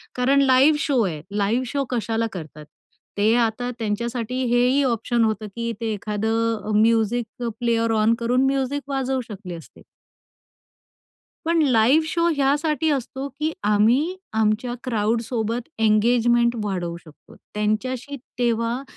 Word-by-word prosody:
कारण 270 +3 +3
live 270 +3 +5
show 270 -5 +1
आहे. 160 -6 -3
Live 210 +5 0
show 280 +3 -1
कशाला 230 -2 -1
करतात? 155 -4 -9 0.5
ते 210 +2 +3
आता 240 +1 0
त्यांच्यासाठी 235 +2 -3 0.2
हेही 250 +3 +3
ऑप्शन 235 -1 +1
होतं, 220 -1 -1
की 235 0 -2
ते 225 -1 -1
एखादं 220 +2 -1
अ, - - 0
म्युझिक 225 +2 +1 0.2
प्लेयर 230 -1 +1
ऑन 220 +2 +4
करून 245 +3 +2
म्युझिक 270 +1 0
वाजवू 265 -1 -1
शकले 190 -4 -7
असते. 165 - -14 1.6
पण 335 0 +2
लाईव्ह 265 +3 +4
शो 335 +1 +1
ह्यासाठी 290 +2 +1
असतो, 270 0 -3
की 305 +4 -3
आम्ही 235 - +2 0.2
आमच्या 220 +3 0
क्राउडसोबत 230 +1 -1
एंगेजमेंट 235 +2 +3
वाढवू 180 -4 -3
शकतो. 155 -2 -17 0.2
त्यांच्याशी 240 +6 -2 0.2
तेव्हा 235 +1 0
235 Hz, 125 wpm, -23 LUFS, 220-260 Hz, 1.6 s, लाईव्ह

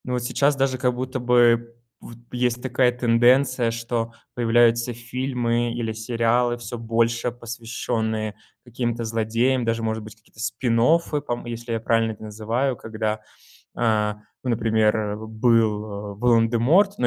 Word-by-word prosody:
Ну 125 - -2
а - - 0
сейчас 135 +4 +1
даже 135 -1 0
как 125 -1 0
будто 130 +1 -3
бы 120 -1 +3 0.2
вот 115 - -12
есть 125 -1 -1
такая 130 -1 +2
тенденция, 125 +1 +3
что 115 0 -3 0.2
появляются 120 0 +3
фильмы 120 -1 -1
или 115 -2 -2
сериалы, 115 +2 0
всё 120 0 -7
больше 115 +1 0
посвященные 115 -2 -3 0.3
каким-то 120 -1 -3
злодеям. 115 +3 0
Даже 115 0 -1
может 110 0 -1
быть 110 0 -11
какие-то, 110 +1 -23
спин-оффы 125 +7 +1
пом 120 -4 -4
если 120 0 -5
я 115 - -1
правильно 115 0 +1
их 105 - -16
называю. 110 +5 -2
Когда, 110 -1 -3 0.5
а, 105 -3 +1 0.3
ну 125 - 0
например, 110 -2 +2
э, 105 -1 -2
был 110 -3 0
Волан-де-Морт, 120 - +3
но 125 - +2
115 Hz, 140 wpm, -23 LUFS, 110-125 Hz, 0.5 s, бы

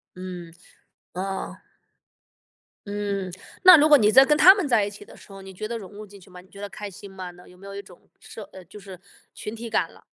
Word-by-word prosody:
嗯。 180 -2 -9 0.6
哦。 190 +1 -5 1.3
嗯， 200 -2 -4 0.3
那 370 -2 +10
如 305 +1 +4
果 295 - +8
你 210 -4 +3
在 265 +4 +7
跟 300 +2 +2
他 375 +4 +8
们 395 -5 -2
在 230 -6 +2
一 - - -4
起 205 - -13
的 - - -16
时 - - -17
候， 195 0 -11
你 190 0 -12
觉 215 +4 -6
得 235 +1 -5
融 200 -4 -11
入 210 +1 -10
进 200 0 -15
去 185 - -19
吗？ 180 -1 -13
你 180 - -18
觉 200 - -13
得 205 - -6
开 205 0 -8
心 195 +1 -13
吗？ 185 -1 -8
那 180 0 -18
有 180 - -18
没 195 +2 -14
有 200 - -9
一 200 - -6
种 185 -3 -18 0.2
社 220 - -11
呃， 190 - -12
就 190 +5 -13
是 190 -3 -12 0.3
群 210 - -8
体 230 +1 -8
感 220 - -1
了？ - - -20
200 Hz, 265 characters per minute, -24 LUFS, 185-215 Hz, 1.3 s, 那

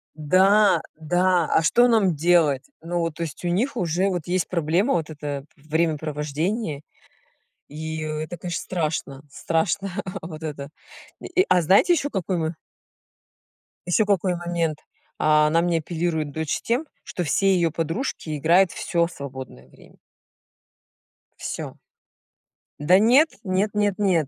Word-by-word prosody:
Да, 190 +6 +4
да, 175 +2 +1
а - - +4
что 240 +9 +4
нам 210 -8 +3
делать? 155 -3 +3 0.2
Ну, 175 +2 -3
вот, 165 -2 -2
то 170 - -8
есть, 160 -1 -7
у - - +1
них 235 +10 0
уже 180 -1 0
вот 175 -5 -3
есть 180 0 0
проблема- 175 - +1
вот 165 -2 -1
это 145 -2 -5
времяпровождение. 155 +3 -2 0.9
И 160 +1 -5
это, 155 +2 -4
конечно, 175 +1 -4
страшно, 155 -5 -3
страшно 170 +7 -1 0.3
вот 160 -1 -9
это. 145 -3 -5 0.5
И, 370 +2 +1
а 180 - +4
знаете 195 - +5
ещё 290 -3 -1
какой 190 -4 -2
мо 160 0 -2 1.3
ещё 180 +5 +2
какой 190 -3 +1
момент? 170 -3 -2 0.4
Она 155 +1 +3
мне 170 -1 +1
апеллирует, 160 -2 -2
дочь, 155 0 -2
тем, 245 +7 0 0.2
что 180 - -4
все 195 +5 +2
её 170 -2 +1
подружки 165 - -3
играют 170 +5 +4
всё 170 -1 0
свободное 130 - -9
время. - - -20 1.4
Всё. - - -6 1.0
Да 175 +6 +5
нет 255 +9 +5
нет 195 +1 0
нет 205 -2 +1
нет. 180 -8 +2
170 Hz, 135 wpm, -23 LUFS, 155-185 Hz, 1.4 s, знаете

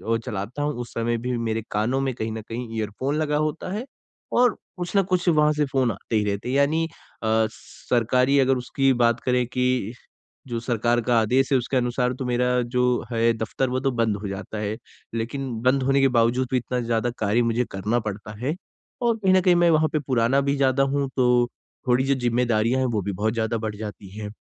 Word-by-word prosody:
अ, - - +2
चलाता 110 +8 -4
हूँ, 150 0 0
उस 120 - -9
समय 115 0 0
भी 125 +1 -2
मेरे 115 -1 -2
कानों 120 +6 0
में 135 -2 -1
कहीं 110 -1 -3
ना 110 - -5
कहीं 115 +1 -6
इयरफ़ोन 110 +7 -2
लगा 150 -1 0
होता 155 +4 -2
है 225 +5 -3 0.5
और 245 -3 +4 0.2
कुछ 175 +2 -5
न 195 - +5
कुछ 180 -1 +2
वहाँ 150 -1 +4
से 150 0 +1
फ़ोन 130 -4 +2
आते 105 +3 -5
ही 105 - +1
रहते 100 +4 -2
हैं। 135 - 0
यानी 155 +3 +2 0.4
अ, - - 0 0.2
सरकारी 125 +4 0
अगर 135 -1 +3
उसकी 135 +2 +1
बात 115 0 +2
करें 125 -1 +2
कि 125 -3 0 0.5
जो 120 -1 -3
सरकार 120 0 +1
का 120 0 +2
आदेश 130 +5 +2
है, 135 - +5
उसके 130 +2 -1
अनुसार 125 0 0
तो 130 - -3
मेरा 125 0 +1
जो 125 - +3 0.3
है 115 0 +3
दफ़्तर, 120 +4 -1
वो 130 +1 0
तो 135 0 0
बंद 115 -4 0
हो 100 0 -6
जाता 100 +2 -6
है। 105 +1 -2 0.4
लेकिन 130 +4 -3
बंद 130 +1 +3
होने 135 +1 +3
के 135 - +5
बावजूद 120 +3 +2
भी 130 - +3
इतना 125 +1 -2
ज़्यादा 115 +1 0
कार्य 110 +3 +2
मुझे 115 +1 +1
करना 105 +5 0
पड़ता 105 +1 -5
है, 145 +7 -1 0.5
और 235 -1 +2
कहीं 190 -3 +2
ना 185 - +5
कहीं 180 -1 +4
मैं 175 0 +4
वहाँ 155 0 +4
पे 155 - +2
पुराना 130 +2 +2
भी 140 +1 0
ज़्यादा 135 0 +3
हूँ, 140 0 0
तो 125 -2 +3 0.4
थोड़ी 125 +1 +3
जो 140 0 +2
ज़िम्मेदारियाँ 120 0 +1
हैं, 130 - +1
वो 110 -4 -1
भी 100 +2 -3
बहुत 110 +4 -1
ज़्यादा 115 0 -1
बढ़ 110 -1 -4
जाती 105 -2 -8
हैं 105 -1 -5
125 Hz, 220 wpm, -24 LUFS, 115-135 Hz, 0.5 s, न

